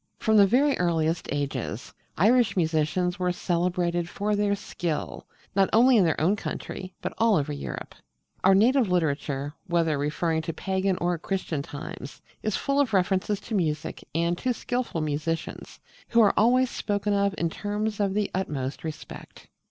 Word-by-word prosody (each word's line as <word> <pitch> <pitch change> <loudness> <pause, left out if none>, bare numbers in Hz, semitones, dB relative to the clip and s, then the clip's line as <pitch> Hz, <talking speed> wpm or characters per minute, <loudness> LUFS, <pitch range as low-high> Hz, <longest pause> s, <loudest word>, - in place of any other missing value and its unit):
From 220 -1 +1
the 200 -1 +7
very 275 +6 +3
earliest 165 -1 0
ages 135 -5 -3 0.2
Irish 230 +4 +4
musicians 170 +2 0
were 180 -1 +1
celebrated 175 -1 -1
for 205 +2 -1
their 205 0 +1
skill, 175 -5 -4 0.3
not 195 -1 +3
only 250 +3 +6
in 210 - +6
their 160 - +1
own 180 +6 +3
country 185 -2 -6
but - - -3
all 225 -2 +4
over 150 -2 0
Europe. 140 - -6 0.5
Our 190 +1 +6
native 235 +2 +4
literature, 145 -4 -1
whether 165 -4 +1
referring 160 +3 0
to 165 +1 -4
pagan 190 +1 -1
or 175 -1 0
Christian 180 -5 -2
times, 140 -1 -8 0.2
is 215 -2 -1
full 280 0 0
of 265 -6 +1
references 190 +2 +1
to 230 - -7
music 155 -6 -1
and 170 +1 +1
to 250 -1 0
skilful 245 -10 -2
musicians, 155 +2 -3 0.3
who 235 - +4
are 210 - +5
always 250 +3 +4
spoken 205 0 -1
of 200 0 +1
in 170 -1 -1
terms 210 +2 -3
of 200 -1 0
the 210 -1 0
utmost 145 -5 -3
respect. 160 -2 -9
180 Hz, 160 wpm, -26 LUFS, 160-210 Hz, 0.5 s, the